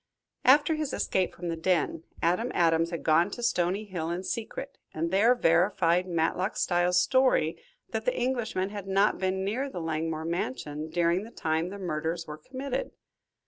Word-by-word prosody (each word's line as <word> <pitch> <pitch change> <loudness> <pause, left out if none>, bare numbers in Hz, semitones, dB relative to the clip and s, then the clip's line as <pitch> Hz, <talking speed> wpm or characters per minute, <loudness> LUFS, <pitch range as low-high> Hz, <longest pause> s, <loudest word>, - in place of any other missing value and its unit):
After 290 +4 +6
his 305 -3 -2
escape 185 -1 0
from 175 0 -5
the 165 - -1
den, 165 -1 0 0.2
Adam 180 +9 +2
Adams 165 -1 +3
had 170 -1 -5
gone 165 +4 +4
to 240 +4 -7
Stony 195 -2 +1
Hill 175 -5 -4
in 175 +2 -3
secret, 235 +6 -5 0.2
and 165 +2 -1
there 220 +6 +5
verified 175 -2 +3
Matlock 175 +3 0
Styles' 175 0 +2
story 260 - +2 0.3
that - - -3
the - - 0
Englishman 230 -6 -1
had 205 -2 -6
not 195 +2 +2
been 190 0 -1
near 255 +8 -1
the 180 - -6
Langmore 160 -1 -2
mansion 150 -2 -3
during 170 +2 +1
the 220 - -9
time 160 -4 -1
the 200 - -7
murders 165 -2 -3
were 150 -1 -8
committed. 275 - -4
180 Hz, 170 wpm, -28 LUFS, 165-215 Hz, 0.3 s, After